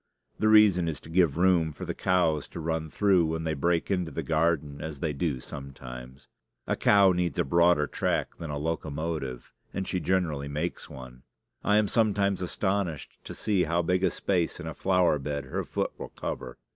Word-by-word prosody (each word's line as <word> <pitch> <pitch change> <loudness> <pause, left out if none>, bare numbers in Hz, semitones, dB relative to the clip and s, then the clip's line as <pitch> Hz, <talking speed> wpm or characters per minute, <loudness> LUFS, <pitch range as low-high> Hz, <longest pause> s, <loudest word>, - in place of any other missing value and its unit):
The 110 - +2
reason 105 -5 +6
is 80 - -3
to - - -13
give 85 -4 +3
room 85 -3 +3
for - - -7
the - - -3
cows 85 -5 +1
to - - -8
run 80 0 -2
through 95 0 +3
when 80 0 -2
they 80 -1 -1
break 85 +5 0
into 90 -4 0
the 80 - -4
garden 75 -2 0
as 80 -3 -6
they 75 0 -1
do 70 -2 -1
sometimes. 65 -1 -9 0.4
A - - 0
cow 100 -2 +5
needs 90 -1 -1
a - - +3
broader 85 0 +4
track - - -2
than 80 - -6
a 75 - -3
locomotive; 75 -4 -4 0.2
and 95 -1 -2
she 90 - -1
generally 85 -6 0
makes 75 +1 -4
one. 65 -1 -11 0.4
I 105 - +3
am 105 -1 +3
sometimes 100 -4 +1
astonished 95 -3 -2
to - - -7
see 100 -4 +1
how 85 +2 +1
big 90 +2 +1
a 95 - +4
space 85 -1 -1
in 85 - -7
a 80 - -4
flower 90 -5 +2
bed 70 0 -3
her 65 - -3
foot - - -2
will - - -6
cover. 60 -2 -6
80 Hz, 195 wpm, -28 LUFS, 75-90 Hz, 0.4 s, reason